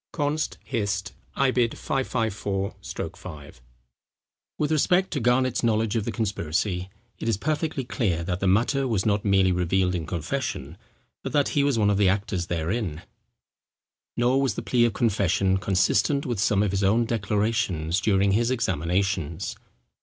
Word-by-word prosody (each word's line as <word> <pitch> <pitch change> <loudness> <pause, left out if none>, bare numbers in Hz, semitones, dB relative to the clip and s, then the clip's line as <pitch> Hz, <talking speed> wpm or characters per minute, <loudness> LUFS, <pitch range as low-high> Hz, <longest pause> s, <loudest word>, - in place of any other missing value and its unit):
—Const. 150 0 -1
Hist. 105 -4 -2 0.2
i. 135 -1 +3
554 115 -5 -1 0.4
5.] 75 -9 -11 1.0
With 150 0 0
respect 180 +5 +2
to 145 - -1
Garnet's 125 +1 +2
knowledge 110 -1 +1
of 110 -3 0
the 115 - -2
conspiracy, 95 -3 -2 0.3
it 115 - -2
is 110 - +1
perfectly 150 +2 -1
clear 100 - -1
that 90 +1 -2
the 95 - 0
matter 120 +8 +2
was 110 -6 0
not 105 -1 +1
merely 95 -2 +3
revealed 90 +1 +1
in 85 -4 -3
confession, 80 -3 -3 0.5
but - - -5
that 145 -2 +3
he 145 - +1
was 140 -4 +2
one 105 -2 +3
of 100 - +1
the 100 -2 +5
actors 95 -3 -1
therein. 85 0 -2 1.1
Nor 125 +3 +3
was 135 -4 0
the - - -4
plea 120 -2 +3
of 115 - 0
confession 95 -4 +1
consistent 100 - +2
with 120 -5 -2
some 105 -3 +3
of 105 - 0
his 100 0 0
own 110 +5 +3
declarations 105 -6 0
during 100 -2 +3
his 115 +4 +2
examinations. 90 - -1
105 Hz, 155 wpm, -25 LUFS, 95-120 Hz, 1.1 s, the